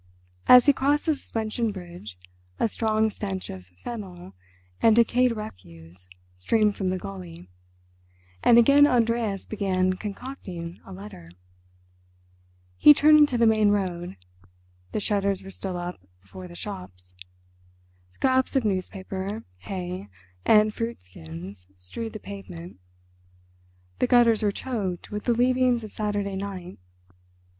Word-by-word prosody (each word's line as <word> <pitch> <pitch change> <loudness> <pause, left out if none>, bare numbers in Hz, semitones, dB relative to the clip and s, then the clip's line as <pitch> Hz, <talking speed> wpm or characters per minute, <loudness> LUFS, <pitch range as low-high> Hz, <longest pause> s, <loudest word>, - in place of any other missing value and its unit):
As 250 -1 +9
he 285 - +6
crossed 285 +2 +1
the 320 - +3
suspension 225 -4 -3
bridge 175 - -10 0.4
a - - +3
strong 220 0 +1
stench 195 -2 -5
of 95 -1 -10 0.2
fennel 185 - -7 0.5
and 225 -1 +6
decayed 235 +1 +3
refuse 90 - -10 0.3
streamed 210 - +2
from 190 -2 -1
the 185 - -1
gulley, 90 - -9 0.9
and 235 - +7
again 280 +5 +7
Andreas 230 -5 +1
began 185 -3 0
concocting 195 -5 -7
a - - -10
letter. 190 - -10 1.5
He 295 - +8
turned 305 +1 +6
into 290 -5 +4
the 235 - +4
main 215 -2 +4
road. 180 - -2 0.7
The - - -1
shutters 200 -1 0
were 195 - -9
still 190 -1 -5
up 175 - -6 0.2
before 180 - -10
the 175 - -12
shops. 90 - -8 1.0
Scraps 260 - +1
of 260 -4 +2
newspaper, 190 +1 -3
hay, 180 - -5 0.4
and 215 -1 +5
fruit 230 - -4
skins 90 +2 -10
strewed 155 - -5
the 215 - -6
pavement; 180 - -9 1.2
the - - +2
gutters 240 -3 +5
were 210 -1 +2
choked 200 -7 -4
with 210 0 -5
the 240 - +3
leavings 250 0 +2
of 215 - -8
Saturday 205 -2 -2
night. 190 -2 -6
200 Hz, 130 wpm, -25 LUFS, 175-230 Hz, 1.5 s, As